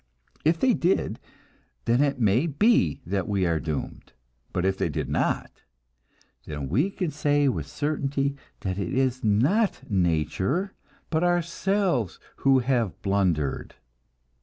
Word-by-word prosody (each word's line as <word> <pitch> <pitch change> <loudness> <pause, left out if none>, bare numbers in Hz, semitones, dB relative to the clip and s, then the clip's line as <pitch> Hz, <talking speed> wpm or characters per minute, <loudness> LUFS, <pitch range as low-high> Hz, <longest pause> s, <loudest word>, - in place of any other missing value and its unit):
If 160 +2 +2
they 260 -2 +4
did, 180 -1 0 0.7
then 120 +3 +3
it 140 -2 +1
may 115 +7 +3
be 145 - +2
that 95 +1 -2
we 100 -3 +1
are 85 -2 +1
doomed; 80 -2 -5 0.4
but 90 0 -1
if 95 0 +2
they - - -1
did - - -3
not, - - -1 0.9
then 75 -3 -5
we 140 - +2
can 180 -4 -3
say 145 -1 +2
with 130 - -1
certainty 140 -2 -1 0.3
that 95 0 -3
it 100 +7 -2
is 130 -1 +1
not 135 - +2
nature, 95 - 0 0.4
but 160 +1 +1
ourselves, 175 - 0 0.2
who 135 -1 +4
have 120 -7 0
blundered. 90 -8 0
130 Hz, 135 wpm, -26 LUFS, 95-160 Hz, 0.9 s, they